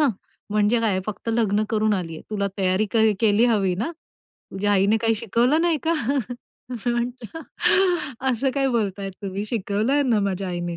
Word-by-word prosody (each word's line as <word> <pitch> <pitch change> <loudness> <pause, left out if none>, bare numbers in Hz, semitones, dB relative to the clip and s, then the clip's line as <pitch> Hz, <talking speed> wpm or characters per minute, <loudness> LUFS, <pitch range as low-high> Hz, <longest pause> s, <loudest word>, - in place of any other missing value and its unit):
"ह्, 295 - +4 0.4
म्हणजे 210 +3 +2
काय; 205 -5 +1
फक्त 215 +2 -6
लग्न 215 -2 +1
करून 215 -1 +2
आलीये? 165 -4 -5
तुला 200 -2 -1
तयारी 190 +2 +1
कर 220 -1 +4
केली 220 +1 +4
हवी 200 -6 +2
ना? 225 - -2 0.6
तुझ्या 205 +2 0
आईने 200 +2 +3
काही 225 0 +1
शिकवलं" 235 +7 +1
"नाही 340 -3 +2
का?" 330 - +3 0.8
मी 240 -1 -2
म्हणलं, 240 +4 -4 0.9
"असं 260 +2 0
काय 275 -1 +1
बोलताय 200 -5 -1
तुम्ही, 195 +1 -4
शिकवलंय 220 +6 0
ना 235 -6 +2
माझ्या 195 -1 -2
आईने. 175 -1 -4
215 Hz, 160 wpm, -23 LUFS, 200-240 Hz, 0.9 s, ह्